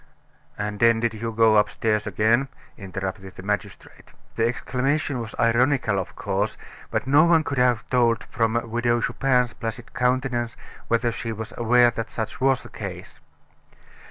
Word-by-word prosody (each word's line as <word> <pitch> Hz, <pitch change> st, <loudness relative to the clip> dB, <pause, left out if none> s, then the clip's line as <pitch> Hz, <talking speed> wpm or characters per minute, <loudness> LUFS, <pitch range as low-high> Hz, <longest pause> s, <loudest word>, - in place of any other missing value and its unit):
"And 105 Hz, 0 st, -4 dB
then 115 Hz, -1 st, +4 dB
did 115 Hz, 0 st, 0 dB
you 115 Hz, +1 st, -4 dB
go 110 Hz, -1 st, +4 dB
upstairs 105 Hz, +1 st, +1 dB
again?" 110 Hz, +7 st, +2 dB, 0.3 s
interrupted 95 Hz, -1 st, -6 dB
the -, -, -10 dB
magistrate. 105 Hz, +1 st, -5 dB, 0.2 s
The 115 Hz, 0 st, +2 dB
exclamation 135 Hz, +3 st, -1 dB
was 115 Hz, -2 st, -7 dB
ironical, 115 Hz, -2 st, +2 dB
of 95 Hz, -, -6 dB
course, 100 Hz, +2 st, -2 dB, 0.3 s
but -, -, -1 dB
no 145 Hz, +4 st, +5 dB
one 165 Hz, -2 st, +4 dB
could 140 Hz, -3 st, -2 dB
have 125 Hz, -3 st, +2 dB
told 115 Hz, -4 st, +2 dB
from 115 Hz, -1 st, -1 dB
the 115 Hz, 0 st, 0 dB
Widow 120 Hz, +1 st, 0 dB
Chupin's 125 Hz, -2 st, +1 dB
placid 115 Hz, 0 st, -6 dB
countenance 125 Hz, -2 st, 0 dB, 0.3 s
whether 115 Hz, 0 st, +1 dB
she 115 Hz, 0 st, -5 dB
was 110 Hz, +1 st, -6 dB
aware 120 Hz, +1 st, +4 dB
that 115 Hz, -1 st, -5 dB
such 110 Hz, +2 st, -5 dB
was 135 Hz, -1 st, +2 dB
the -, -, -11 dB
case. -, -, -8 dB
115 Hz, 155 wpm, -24 LUFS, 110-125 Hz, 0.3 s, no